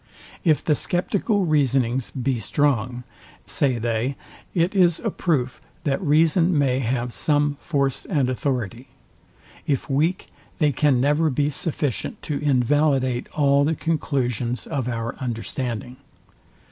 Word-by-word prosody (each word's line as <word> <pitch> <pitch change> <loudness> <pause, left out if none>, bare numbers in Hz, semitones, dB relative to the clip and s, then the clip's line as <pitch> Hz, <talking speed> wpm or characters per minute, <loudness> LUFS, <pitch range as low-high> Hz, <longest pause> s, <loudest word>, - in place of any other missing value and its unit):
If 155 -4 +2
the 155 - +3
sceptical 195 - 0
reasonings 130 -5 +1
be 130 -1 -2
strong, 125 +1 0 0.4
say 130 -4 +1
they, 115 +3 -1 0.4
it 175 +3 +2
is 175 -4 +4
a 220 - -2
proof, 135 -10 -1 0.2
that 145 +5 0
reason 165 +2 +3
may 135 -3 +2
have 125 -1 -2
some 145 -1 +1
force 140 -4 -1
and 145 -8 +1
authority: 125 -2 -2 0.8
if 140 0 -1
weak, 160 +7 0 0.3
they 150 -3 +3
can 140 -1 +2
never 150 +4 +2
be 145 +2 0
sufficient 145 -3 -2
to 145 -2 -2
invalidate 135 -2 +1
all 140 -1 +4
the 160 +3 +1
conclusions 125 -7 -1
of 135 -6 -3
our 115 -1 -3
understanding. 125 0 -4
140 Hz, 125 wpm, -23 LUFS, 125-155 Hz, 0.8 s, is